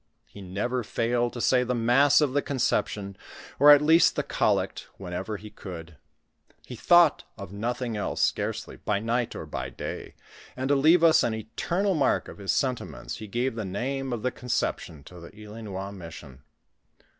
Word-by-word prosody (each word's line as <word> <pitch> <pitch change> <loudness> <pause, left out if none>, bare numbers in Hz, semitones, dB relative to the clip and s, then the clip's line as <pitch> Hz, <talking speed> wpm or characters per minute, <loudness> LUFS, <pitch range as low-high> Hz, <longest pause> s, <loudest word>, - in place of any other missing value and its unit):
lie 100 - -10
never 105 +7 -2
failed 120 +2 0
to 120 - -7
say 125 +1 +3
the 125 0 -1
mast* 135 +5 +4
of 145 -4 +1
the 145 - +2
Conception, 105 -7 -1 0.4
or 145 +2 +7
at 145 0 +8
least 160 +3 +5
the - - -1
collect, - - -1
whenever 95 +3 -5
ho 105 +2 -11
could, 85 -4 -9 0.8
.le - - -5
thought 175 -4 +4
of 90 - -9
nothing 120 +2 -3
else 105 - -3
scarcely - - -1
by 105 - -1
night 115 +2 -1
or - - -6
by 65 0 -5
day, - - -7 0.4
and 130 +1 -2
to 145 - +4
leave 160 +5 +5
us 165 -1 +6
an 110 - 0
eternal 170 - -1
mark 145 -6 +1
of - - -11
his 100 -1 -1
sentiments, 130 -3 -3
he 110 - -8
gave 120 +5 -1
the 110 -1 -4
name 130 +8 -3
of 120 -3 -4
the 125 - 0
Coi.ception 85 - -3
to 90 +2 -12
the 85 - -11
Ilinois 105 -2 -7
mission. 80 -7 -11
115 Hz, 175 wpm, -26 LUFS, 100-135 Hz, 0.8 s, at